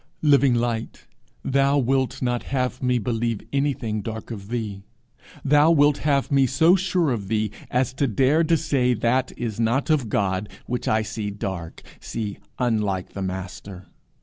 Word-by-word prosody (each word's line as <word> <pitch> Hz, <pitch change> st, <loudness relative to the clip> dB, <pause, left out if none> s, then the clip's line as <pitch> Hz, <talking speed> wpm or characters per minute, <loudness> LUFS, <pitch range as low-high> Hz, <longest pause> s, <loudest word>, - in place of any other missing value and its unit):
Living 140 Hz, -4 st, +5 dB
Light, 115 Hz, -1 st, -2 dB, 0.4 s
thou 140 Hz, +1 st, +3 dB
wilt 135 Hz, 0 st, 0 dB
not 120 Hz, -1 st, 0 dB
have 125 Hz, -1 st, -2 dB
me 125 Hz, -1 st, +2 dB
believe 115 Hz, -1 st, -1 dB
anything 135 Hz, -6 st, -1 dB
dark 110 Hz, +2 st, -6 dB
of 100 Hz, -3 st, -7 dB
thee! 110 Hz, -5 st, -3 dB, 0.6 s
thou 150 Hz, +3 st, +5 dB
wilt 145 Hz, -3 st, +4 dB
have 140 Hz, -2 st, +1 dB
me 135 Hz, -1 st, +4 dB
so 160 Hz, +8 st, +4 dB
sure 180 Hz, -5 st, +1 dB
of 105 Hz, -5 st, -3 dB
thee 110 Hz, -1 st, 0 dB, 0.2 s
as 125 Hz, 0 st, 0 dB
to 140 Hz, +1 st, 0 dB
dare 135 Hz, +8 st, +3 dB
to 165 Hz, +1 st, +3 dB
say 135 Hz, -5 st, +1 dB
that 125 Hz, +3 st, +1 dB
is 115 Hz, -3 st, -4 dB
not 120 Hz, +7 st, +1 dB
of 140 Hz, -8 st, +1 dB
God 100 Hz, 0 st, 0 dB, 0.2 s
which 125 Hz, 0 st, -3 dB
I 110 Hz, 0 st, +2 dB
see 110 Hz, -1 st, -4 dB
dark, 95 Hz, -4 st, -6 dB, 0.2 s
see 105 Hz, -3 st, -5 dB, 0.2 s
unlike 105 Hz, -7 st, 0 dB
the 100 Hz, -, -5 dB
Master! 95 Hz, 0 st, -6 dB
120 Hz, 160 wpm, -23 LUFS, 105-140 Hz, 0.6 s, Living